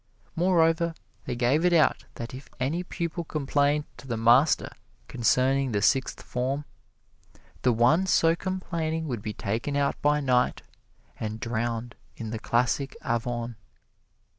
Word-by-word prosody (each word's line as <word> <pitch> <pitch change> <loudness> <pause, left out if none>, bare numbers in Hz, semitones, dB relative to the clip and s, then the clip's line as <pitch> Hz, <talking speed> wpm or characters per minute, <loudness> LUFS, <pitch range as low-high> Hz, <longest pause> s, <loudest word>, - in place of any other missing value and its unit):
Moreover, 170 -1 +2 0.3
they 125 - -3
gave 125 +7 +2
it 180 -1 +4
out 160 -2 +3
that 115 +1 -7
if 130 +2 -10
any 145 +7 0
pupil 170 -1 -4
complained 145 -1 +1
to 135 - -12
the 115 -3 -2
master 120 +7 +4 0.4
concerning 130 +2 +2
the 100 - +1
Sixth 135 +2 +1
Form, 135 +4 -2 1.0
the 125 - +3
one 125 +11 +3
so 165 -2 +4
complaining 165 -3 -3
would 120 -6 -3
be 105 +1 -4
taken 115 +8 -2
out 140 -1 0
by 150 0 +3
night 125 -3 +1 0.6
and 110 0 -4
drowned 115 +1 -2 0.2
in 110 -1 -5
the 110 - -4
classic 125 +4 0
Avon. 120 0 -2
135 Hz, 140 wpm, -27 LUFS, 120-160 Hz, 1.0 s, it